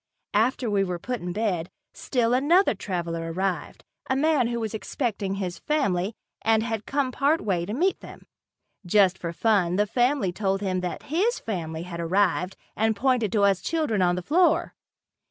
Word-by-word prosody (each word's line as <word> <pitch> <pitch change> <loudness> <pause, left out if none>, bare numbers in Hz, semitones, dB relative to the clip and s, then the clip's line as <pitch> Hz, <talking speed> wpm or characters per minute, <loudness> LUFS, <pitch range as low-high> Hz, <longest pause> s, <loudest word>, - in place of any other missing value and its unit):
After 235 +4 +2
we 200 -2 +2
were 180 -2 -2
put 250 +7 -4
in 175 0 -4
bed, 185 -4 -1 0.2
still 240 -2 0
another 315 +9 +4
traveler 170 -4 -4
arrived, 185 +1 -3 0.3
a 265 - +2
man 290 -3 +2
who 235 0 -2
was 220 -1 -3
expecting 210 -3 -2
his 185 -3 -4
family 200 -9 0 0.3
and 220 0 +3
had 225 -2 -3
come 275 -2 0
part 285 +5 +2
way 175 -4 -1
to 210 - -3
meet 370 +7 +1
them. - - -12 0.6
Just 190 0 +4
for 170 -3 -5
fun 180 -2 +2
the 205 +2 +3
family 245 -1 +1
told 195 +1 -1
him 185 -2 -1
that 180 -1 -4
his 390 - +1
family 165 -6 -4
had 170 -1 -7
arrived 180 +1 +1 0.2
and 220 0 +1
pointed 245 -2 +1
to 210 -2 +3
us 195 -2 +3
children 305 - 0
on 175 -1 +3
the 180 - -4
floor. 345 - +2
205 Hz, 175 wpm, -25 LUFS, 180-250 Hz, 0.6 s, another